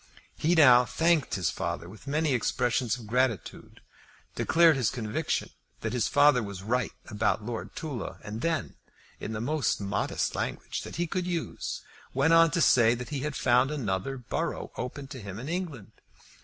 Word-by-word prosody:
He 170 +3 +2
now 125 -6 +8
thanked 165 +1 +1
his 90 -5 0
father 85 - -4
with 110 +8 -13
many 150 0 +1
expressions 120 0 0
of 120 - -10
gratitude, 120 -2 -2 0.5
declared 165 -2 +4
his 130 -5 +1
conviction 110 -4 -2 0.3
that - - -3
his 120 -4 +1
father 145 -3 +5
was 100 -3 -6
right 120 +2 0 0.2
about 105 0 -1
Lord 115 -1 -5
Tulla, 140 -9 -5
and 105 +2 -6
then, 165 +1 -1 0.4
in 110 - -5
the 110 - -3
most 140 -3 0
modest 100 0 -1
language - - -3
that - - -8
he 175 +3 0
could 180 +1 -2
use, 170 -2 -3 0.3
went 165 - +4
on 165 0 +7
to 170 - 0
say 120 -5 +5
that 125 0 -7
he 145 -2 -3
had 150 +1 -3
found 125 +2 +3
another 130 -3 -2
borough 125 - -3
open 135 +3 -5
to 130 -4 -8
him 100 -1 -7
in 125 +5 -6
England. 160 - -4
125 Hz, 170 wpm, -28 LUFS, 110-150 Hz, 0.5 s, now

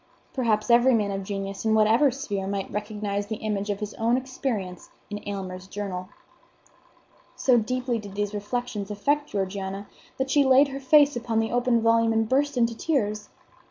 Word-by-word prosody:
Perhaps 230 -3 +1
every 240 +1 +6
man 205 -2 0
of 195 0 -3
genius 195 0 -5
in 220 -1 +2
whatever 220 +6 +5
sphere 205 -7 -4
might 195 -1 -3
recognize 205 -1 -3
the 220 - -3
image 210 -1 -3
of 200 -1 -1
his 210 0 -4
own 230 +2 +3
experience 250 -8 -4 0.2
in 205 - -4
Aylmer's 190 -2 -6
journal. 190 -2 -5 1.3
So 250 -3 +4
deeply 250 +1 -1
did 200 -2 -10
these 205 0 -2
reflections 210 -1 -3
affect 290 +8 0
Georgiana 195 0 -3 0.3
that 265 0 -1
she 290 - +5
laid 270 +1 +5
her 275 0 -5
face 290 +1 +5
upon 235 -1 -2
the 225 0 +1
open 245 -1 +2
volume 230 0 +3
and 225 0 +1
burst 280 +2 +1
into 235 -1 +2
tears. 215 -8 -1
220 Hz, 170 wpm, -26 LUFS, 200-250 Hz, 1.3 s, every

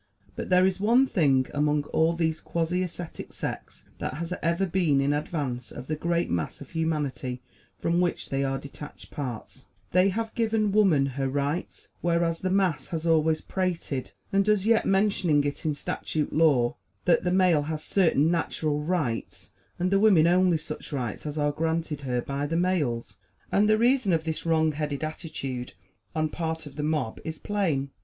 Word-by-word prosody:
But - - -5
there 180 0 +5
is 190 0 +1
one 235 +6 +4
thing 140 - +2
among 150 0 +1
all 160 +1 +3
these 160 -2 -1
quasi 170 +2 -1
ascetic 175 -2 -6
sects - - -6
that - - -3
has 170 +3 -4
ever 170 +3 +1
been 175 -6 +2
in 140 +1 +2
advance 145 -5 -3
of 125 - -8
the 155 - -2
great 170 +2 0
mass 85 -2 -2
of 140 - -11
humanity 145 -6 -2 0.3
from 170 +1 +1
which 175 -1 -1
they 135 0 0
are 135 0 0
detached 140 +2 -10
parts: 125 -6 -6 0.2
they 185 +2 +4
have 225 +3 -3
given 220 -2 +1
woman 190 -9 +4
her 135 0 -2
rights; 145 +5 -3
whereas, 170 -1 +1
the 185 - -1
mass 185 -7 +1
has 165 -1 -4
always 160 -1 +3
prated, 170 -8 -3 0.2
and 195 0 +4
does 210 -1 +2
yet, 225 0 +3
mentioning 190 -7 +3
it 145 +2 -3
in 150 - 0
statute 150 +1 -3
law, 140 -7 +3 0.3
that 175 - +4
the 180 - +1
male 180 -4 +4
has 155 -1 -3
certain 165 -5 +3
natural 155 -3 0
"rights," 150 -8 -2 0.3
and 180 +1 0
the 195 - +4
women 195 -7 +6
only 180 0 +4
such 155 +1 -6
rights 130 0 -3
as 150 +1 -4
are 145 -1 +2
granted 160 -1 -2
her 125 -3 -1
by 140 +1 -2
the 165 +2 -1
males. 160 -10 0 0.3
And 210 +2 +3
the 215 - +5
reason 240 -4 +3
of 160 -1 +1
this 160 +1 -4
wrong 160 -1 +3
headed 150 -1 -3
attitude 140 -6 -5 0.4
on 155 0 +1
part 160 0 -3
of 145 - -11
the 150 - -3
mob 150 -6 -1
is 160 0 -5
plain. 160 -10 -1
160 Hz, 180 wpm, -27 LUFS, 145-180 Hz, 0.4 s, women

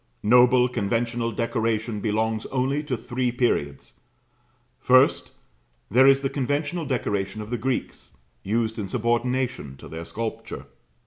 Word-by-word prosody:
Noble 125 +3 +5
conventional 115 +1 -1
decoration 115 -1 -1
belongs 110 +1 -1
only 135 +2 0
to 130 -5 -2
three 125 +2 -2
periods. 70 - -2 0.8
First, 130 +2 +4 0.6
there 130 +5 +6
is 135 0 +5
the 135 - 0
conventional 145 +5 -2
decoration 100 -6 -2
of 105 +2 -7
the 120 - 0
Greeks, 125 - -4 0.2
used 110 +2 -1
in 100 - -3
subordination 120 - -1
to - - -12
their 80 +1 -7
sculpture. 115 +4 -5
120 Hz, 125 wpm, -24 LUFS, 110-130 Hz, 0.8 s, there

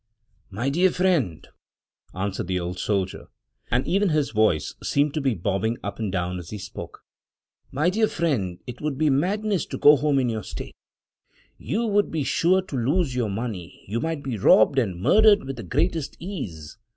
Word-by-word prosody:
"My 115 +8 -2
dear 180 +6 +4
friend," 170 - 0 0.7
answered 95 -1 -3
the 90 0 0
old 90 +1 -5
soldier 95 -3 -2 0.2
— - - -48
and 125 +2 +1
even 200 +1 +2
his 150 -3 +1
voice 110 -8 +1
seemed 145 0 +1
to 155 - -1
be 135 -4 +1
bobbing 100 +5 -1
up 100 +2 -5
and 105 -4 -2
down 90 0 -2
as 85 -1 -10
he 105 - -5
spoke 100 0 -9 0.7
—"my 155 +7 +1
dear 220 +3 +2
friend, 115 - -1
it 125 -1 -8
would 150 -3 -2
be 155 0 +2
madness 195 +6 0
to - - -5
go 145 +1 +7
home 145 0 +1
in 130 -2 +2
your 110 -2 -2
state; - - -8 0.9
you 235 +2 -1
would 205 -2 +2
be 160 -3 -2
sure 185 +7 +2
to 165 - -7
lose 140 +4 +1
your 120 -4 -1
money; 100 -4 -6
you 110 +4 -2
might 160 -1 -3
be 125 -6 -3
robbed 110 +7 +5
and 95 -8 -2
murdered 210 - +5
with 135 -1 -6
the - - -5
greatest 145 - -1
ease. 105 - -7
130 Hz, 190 wpm, -24 LUFS, 100-165 Hz, 0.9 s, go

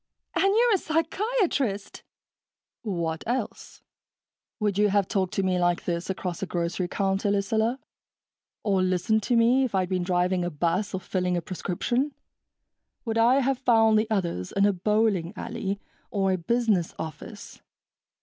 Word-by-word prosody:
"And - - +3
you're 450 +4 +4
a 390 - +3
psychiatrist!" 325 - -1 0.8
"What 170 -6 -3
else? 250 +3 -4 0.8
Would 205 -2 0
you 210 0 +4
have 200 -1 +2
talked 190 -4 0
to 195 - +1
me 185 -1 +1
like 175 0 +1
this 170 +1 -2
across 185 -2 -3
a 195 - -2
grocery 175 +1 -2
counter, 195 +2 0
Lucilla? 220 +4 +1 0.9
Or 195 -3 +2
listened 185 +4 +1
to 240 +4 0
me, 240 +3 +4
if 245 -6 -1
I'd 185 -1 +1
been 185 -1 0
driving 180 0 +1
a 175 - -1
bus 175 +6 -1
or - - -2
filling 180 -1 -1
a - - +1
prescription? 240 - -2 0.9
Would 225 -1 0
I 250 +4 +5
have 270 0 0
found 225 -4 +4
the 220 +1 -1
others 175 - -2
in 200 0 +2
a 205 - +3
bowling 200 -2 +1
alley 205 -4 -4 0.3
or 195 -2 +1
a 185 - +1
business 215 -2 +1
office?" 160 +7 -8
200 Hz, 155 wpm, -26 LUFS, 180-230 Hz, 0.9 s, I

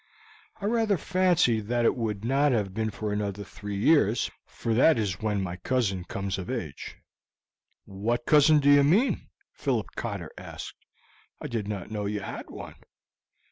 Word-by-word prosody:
I 200 - -5
rather 220 -2 +2
fancied 160 - +2
that 120 0 +1
it - - +3
would 110 -3 -3
not 135 +2 +3
have 100 -5 -1
been 110 +1 -1
for 105 +1 -4
another 100 -1 -3
three 105 +1 -7
years, 115 -1 +3 0.2
for 115 - -3
that 130 +5 +5
is 100 -5 -2
when 105 -3 0
my 90 -1 -4
cousin 100 -3 -1
comes 100 -1 -3
of 90 - -6
age." 100 - -5 0.9
"What 110 +5 -2
cousin 150 0 +6
do 145 0 +4
you 145 0 +7
mean?" 195 - +2 0.2
Philip - - -1
Cotter - - -4
asked. - - -9 0.5
"I - - -8
did 115 -7 -3
not 105 -2 -5
know 105 -2 -2
you 105 0 -2
had - - -7
one." - - -9
110 Hz, 165 wpm, -27 LUFS, 100-140 Hz, 0.9 s, you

